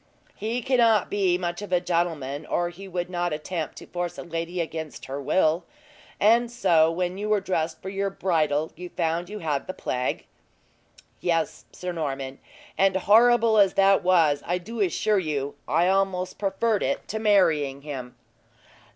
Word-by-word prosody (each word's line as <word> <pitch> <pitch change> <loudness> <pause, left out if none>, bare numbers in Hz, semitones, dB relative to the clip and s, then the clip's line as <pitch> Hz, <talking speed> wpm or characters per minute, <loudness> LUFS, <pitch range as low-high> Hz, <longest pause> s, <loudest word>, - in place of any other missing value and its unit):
"He 230 +3 -3
cannot 235 -5 +3
be 190 -3 +2
much 175 0 -3
of 205 - -7
a 180 - +4
gentleman, 165 -5 -2
or 175 0 0
he 190 +3 -11
would 175 -1 -3
not 175 -2 -2
attempt 155 0 -4
to - - -10
force 175 -1 -4
a - - -6
lady 170 +1 -4
against 160 -2 -5
her 135 +2 -5
will. 160 +3 +2 0.6
And 230 +3 +4
so, 165 -9 +4
when 180 +2 -2
you 210 +1 -3
were 210 -1 +3
dressed 165 -4 -2
for 190 - -4
your 195 0 -1
bridal, 160 -5 0
you 180 +1 -8
found 170 +1 -2
you 210 - -6
had 155 -7 -2
the 185 - -5
plague?" 125 0 -2 0.9
"Yes, 165 -3 -1
Sir 180 0 -5
Norman; 135 -5 -4 0.4
and 195 0 +4
horrible 225 +3 +5
as 195 -2 +4
that 195 0 +5
was 165 -6 +3
I 175 - -1
do 220 +6 -8
assure 205 +2 +2
you 145 -5 -2
I 170 +3 +2
almost 190 -1 0
preferred 210 +1 0
it 280 - -2
to 220 - -2
marrying 160 -10 +2
him." 130 -4 -7
175 Hz, 170 wpm, -25 LUFS, 160-195 Hz, 0.9 s, horrible